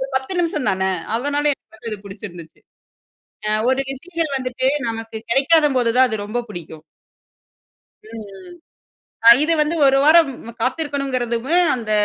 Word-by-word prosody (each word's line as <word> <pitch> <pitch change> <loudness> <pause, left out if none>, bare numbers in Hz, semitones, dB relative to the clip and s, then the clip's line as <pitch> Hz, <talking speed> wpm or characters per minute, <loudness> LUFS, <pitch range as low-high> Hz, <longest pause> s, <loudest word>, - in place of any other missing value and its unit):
10 265 +7 -2
நிமிஷம் 315 -5 -2
தானே. 190 0 0 0.3
அதனால 290 +3 -1
எனக்கு 245 - -21
வந்து 230 - -7
அது 210 - -5
புடிச்சிருந்துச்சு. 185 -5 -11 0.9
ஆ - - +1 0.2
ஒரு 260 +1 +1
விஷயம் 325 +1 -4
வந்துட்டு 260 0 -1 0.2
நமக்கு 225 0 -6
கிடைக்காத 295 +5 +4
போது 235 -2 +2
தான் 260 - +6
அது 220 - -1
ரொம்ப 220 +4 -3
பிடிக்கும். 160 -4 -9 1.3
ம். 225 -1 -8 1.1
ம். 235 - +8
இது 330 - +2
வந்து 300 +2 +1
ஒரு 270 0 +4
வாரம் 315 -1 +6 0.3
காத்திருக்கணுங்கிறதுவும், 270 +1 -1
அந்த 230 -3 -6
260 Hz, 135 wpm, -20 LUFS, 225-290 Hz, 1.3 s, ம்